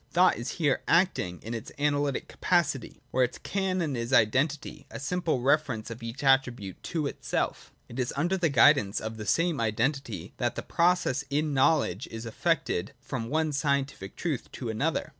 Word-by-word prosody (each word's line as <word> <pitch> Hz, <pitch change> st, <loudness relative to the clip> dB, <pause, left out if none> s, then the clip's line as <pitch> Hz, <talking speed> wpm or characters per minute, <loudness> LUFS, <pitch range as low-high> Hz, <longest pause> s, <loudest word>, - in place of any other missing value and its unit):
Thought 180 Hz, +1 st, +4 dB
is 120 Hz, +2 st, -4 dB
here 145 Hz, -6 st, +1 dB
acting 165 Hz, -, +2 dB
in 115 Hz, -, -5 dB
its 115 Hz, -2 st, -6 dB
analytic 145 Hz, -1 st, 0 dB
capacity, 165 Hz, -7 st, 0 dB
where 130 Hz, -, +3 dB
its 125 Hz, -, -1 dB
canon 185 Hz, -6 st, -1 dB
is 115 Hz, +1 st, -3 dB
identity, 135 Hz, +6 st, +1 dB
a -, -, -7 dB
simple 160 Hz, -2 st, -1 dB
reference 130 Hz, -5 st, +1 dB
of 115 Hz, -, -8 dB
each 115 Hz, +4 st, -6 dB
attribute 125 Hz, -8 st, +2 dB
to 160 Hz, -4 st, -2 dB
itself. -, -, -3 dB, 0.2 s
It 120 Hz, -, -8 dB
is 125 Hz, -1 st, 0 dB
under 175 Hz, +6 st, +1 dB
the 175 Hz, -4 st, +1 dB
guidance 105 Hz, -6 st, +5 dB
of 110 Hz, 0 st, -5 dB
the 105 Hz, -1 st, -6 dB
same 165 Hz, -, +2 dB
identity 115 Hz, -, -1 dB
that 120 Hz, -1 st, -1 dB
the -, -, -4 dB
process 170 Hz, -6 st, +2 dB
in 150 Hz, +1 st, 0 dB
knowledge 130 Hz, -, +2 dB
is 115 Hz, +1 st, -7 dB
effected 115 Hz, -, -1 dB
from 115 Hz, -3 st, -5 dB
one 155 Hz, +2 st, +1 dB
scientific 140 Hz, -7 st, -1 dB
truth 155 Hz, -8 st, -3 dB
to 120 Hz, -, -5 dB
another. 140 Hz, +9 st, -1 dB
135 Hz, 170 wpm, -28 LUFS, 115-155 Hz, 0.2 s, guidance